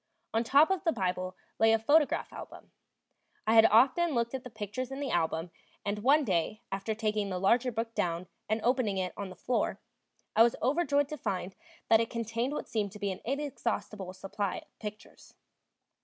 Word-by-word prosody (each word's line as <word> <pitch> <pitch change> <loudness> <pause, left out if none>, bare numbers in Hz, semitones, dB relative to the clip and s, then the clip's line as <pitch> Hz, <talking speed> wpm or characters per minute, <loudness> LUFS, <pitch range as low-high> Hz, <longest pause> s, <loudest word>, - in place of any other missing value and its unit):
On 225 +1 +2
top 285 +9 +5
of 385 - 0
the 330 - +3
Bible 185 - -2 0.2
lay 225 0 +6
a - - +5
photograph 290 +7 +2
album. - - -10 0.7
I 220 - +3
had 225 0 +8
often 270 +8 +4
looked 235 +1 0
at 260 -1 -4
the 250 - -8
pictures 225 +3 -5
in 270 +1 -6
the 285 -2 -2
album, 165 0 0 0.3
and 205 +1 -1
one 280 +7 +4
day, 190 -1 0
after 195 +3 -2
taking 215 -2 -1
the 185 - -2
larger 235 +7 +3
book 225 0 -3
down 170 -2 -1 0.2
and 220 +1 +1
opening 240 -5 +1
it 185 -1 -2
on 200 -2 -5
the 185 - -10
floor, 250 - -1 0.6
I - - +6
was 235 0 +6
overjoyed 285 +1 +2
to 305 - -5
find 190 -5 -3 0.3
that 225 - +6
it 230 - -2
contained 230 +3 -2
what - - -4
seemed 210 -3 -1
to 210 - -10
be 200 -2 -1
an 190 - -7
inexhaustible 235 -7 -3
supply 195 +1 -3
of - - -42
pictures. 210 0 -9
225 Hz, 190 wpm, -30 LUFS, 195-255 Hz, 0.7 s, had